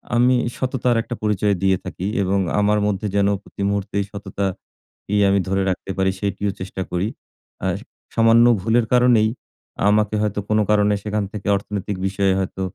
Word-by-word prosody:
আমি 125 +2 +4 0.2
সততার 125 -2 0
একটা 120 +1 -5
পরিচয় 105 -1 +1
দিয়ে 95 -1 +3
থাকি 90 - -5 0.2
এবং 100 +1 +1 0.2
আমার 105 +1 +3
মধ্যে 105 +1 -1
যেন 100 -1 +3 0.2
প্রতি - - -10
মুহূর্তেই 100 0 -1
সততাকেই 100 0 -5
আমি 100 0 +3
ধরে 95 +1 +1
রাখতে 95 +1 -3
পারি, 95 0 +2
সেটিও 100 0 -1
চেষ্টা 95 0 -5
করি। 90 +3 0 0.6
আর 95 -2 +1 0.4
সামান্য 115 +1 +5 0.2
ভুলের 115 +3 +2
কারণেই, 120 -3 +5 0.6
আমাকে 105 0 +2
হয়তো 105 -1 -1
কোনো 110 0 +3
কারণে 105 -1 +3
সেখান 105 0 -1
থেকে 105 -2 -7
অর্থনৈতিক 100 0 -4
বিষয়ে 95 0 +1
হয়তো 95 0 -3
105 Hz, 155 wpm, -21 LUFS, 95-110 Hz, 0.6 s, সামান্য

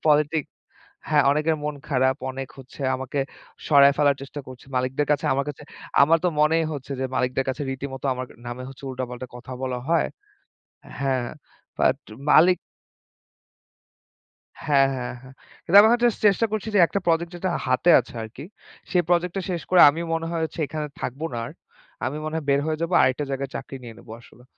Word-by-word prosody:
Politic. 150 0 +3 0.6
হ্যাঁ 150 -1 +4
অনেকের 155 +2 +1
মন 150 0 -2
খারাপ, 130 -1 +2
অনেক 135 0 -6
হচ্ছে 135 +2 -13 0.2
আমাকে 130 +2 -5 0.5
সরায় 140 -2 +7
ফেলার 145 -2 +4
চেষ্টা 140 +1 -7
করছে 130 0 -12
মালিকদের 130 +3 0
কাছে। 150 +2 -1
আমার 140 - 0
কাছে 145 0 -7 0.4
আমার 165 +3 +5
তো - - +4
মনেই 160 +2 +3
হচ্ছে 140 0 -7
যে 130 - 0
মালিকদের 125 +1 0
কাছে 135 +3 -2
রীতিমতো 135 0 -5
আমার 130 0 -5 0.2
নামে 120 +1 -6
হচ্ছে 135 +1 -12
উল্টাপাল্টা 125 0 -5
কথা 125 +1 -10
বলা 130 -1 -2
হয়। 170 -1 +3 0.9
হ্যাঁ, 130 -3 0 0.5
বাট - - +3 0.3
মালিক 180 +4 +6 2.1
হ্যাঁ, 140 -2 +4
হ্যাঁ, 125 -1 -4
হ্যাঁ। 130 0 -14 0.3
কিন্তু 190 - +3
আমি 210 - +7
এখন 240 - +3
যাস্ট 235 - +2
চেষ্টা 205 +3 +4
করছি 215 0 -2
যে - - +5
একটা 200 - -2
প্রোজেক্ট 165 0 +1
যেটা 185 +1 -2 0.2
হাতে 130 +7 +3
আছে 120 - -13
আর 110 - -6
কি, 140 - -7 0.5
সেই 180 -2 +3
প্রোজেক্ট 175 0 +2
টা 195 - -1
শেষ 175 -2 -2
করে 180 - +6
আমি 160 - -6
মনে 165 0 -2
হয় 165 -1 -2
হচ্ছে 160 - -6
এখানে 155 0 -4
থাকবো 140 +6 -4
না - - -2
আর। - - -9 0.5
আমি 135 +3 -2
মনে 155 +1 -4
হয় 160 - -3
বের 140 0 +3
হয়ে 155 0 -2
যাবো 170 +2 -1
আরেকটা 130 +3 +1
জায়গায় 135 0 -3
চাকরি 135 - -6
নিয়ে 115 -2 -9
নেবো 110 - -12
আসলে। 125 +1 -19
140 Hz, 185 wpm, -24 LUFS, 130-165 Hz, 2.1 s, সরায়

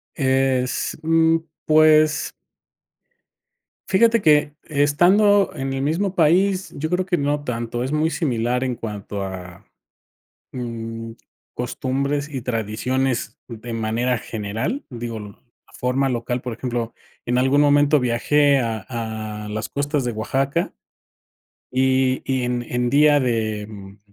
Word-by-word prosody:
Es, 130 -2 +1
mm, 165 0 +4 0.3
pues 155 -1 +4 1.6
fíjate 230 +3 +4
que 150 -3 +4
estando 180 +8 +4
en 135 -2 -3
el 135 - -2
mismo 170 +7 0
país, 185 +4 +2
yo 155 +3 -3
creo 180 +1 0
que 180 - +1
no 145 -1 -1
tanto, 120 -1 -3
es 130 - -2
muy 155 +2 +1
similar 125 -5 -1
en 130 -1 -1
cuanto 105 -3 -6
a, 90 -2 -8 0.9
mm, 115 -2 -5 0.4
costumbres 140 +4 -2
y 135 -4 -5
tradiciones 125 +2 -2
de 115 0 -8
manera 115 +2 0
general, 110 - -4
digo, 120 -2 -6
l 105 - -8
la 120 +4 -26
forma 130 +2 0
local, 120 0 -2
por 125 - -4
ejemplo, 120 0 -3 0.3
en 125 +1 +1
algún 135 +3 +3
momento 145 +1 +4
viajé 140 +3 +3
a 110 -4 -3
a 110 -3 -5
las 110 +1 -4
costas 145 -1 -1
de 120 - -1
Oaxaca 135 +9 -1 1.0
y 130 0 +2
y 130 -1 -1
en 125 0 -1
en 120 0 -1
Día 145 +2 +5
de, 110 -5 -1
mm, 100 -1 -11
130 Hz, 130 wpm, -22 LUFS, 115-150 Hz, 1.6 s, Día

